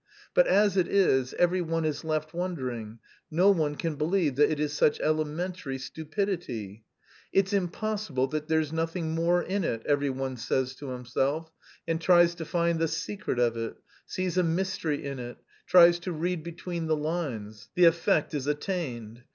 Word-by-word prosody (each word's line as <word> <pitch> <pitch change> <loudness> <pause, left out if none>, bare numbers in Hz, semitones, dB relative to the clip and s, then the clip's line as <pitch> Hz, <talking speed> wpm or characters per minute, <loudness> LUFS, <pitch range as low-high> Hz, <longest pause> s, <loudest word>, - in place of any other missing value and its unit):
But - - +5
as 205 -1 +3
it 180 -2 +3
is, 130 -10 +2
every 180 +1 +2
one 165 -1 -1
is 150 -1 -2
left 155 -1 -2
wondering: 130 -11 -4 0.3
no 180 +5 +5
one 155 -6 0
can 165 +1 -2
believe 155 -2 +1
that 150 - +5
it 155 -2 -1
is 150 -1 -1
such 150 0 +2
elementary 155 -1 -2
stupidity. 140 - -4 0.5
'It's 195 +1 +2
impossible 200 -6 -1
that 155 +1 -3
there's 160 -1 +1
nothing 165 0 -2
more 170 +2 +2
in 195 +1 -1
it,' 115 -7 -2
every 145 -1 +2
one 130 -1 -3
says 130 +2 -1
to 145 - -7
himself 135 +6 -2 0.4
and 165 0 -1
tries 175 0 +5
to 170 -1 -7
find 170 0 +1
the 165 - +2
secret 165 +1 -3
of 120 -1 +2
it, 115 -1 -4 0.3
sees 185 -1 -1
a - - +3
mystery 165 -3 -1
in 140 -2 -4
it, 120 0 -7 0.3
tries 175 -1 +7
to 180 +1 -4
read 170 +1 -2
between 170 0 -5
the 155 -1 +2
lines 135 - -4
the 180 - +4
effect 165 -2 +3
is 145 -2 -2
attained! 140 - -3
160 Hz, 170 wpm, -28 LUFS, 140-175 Hz, 0.5 s, tries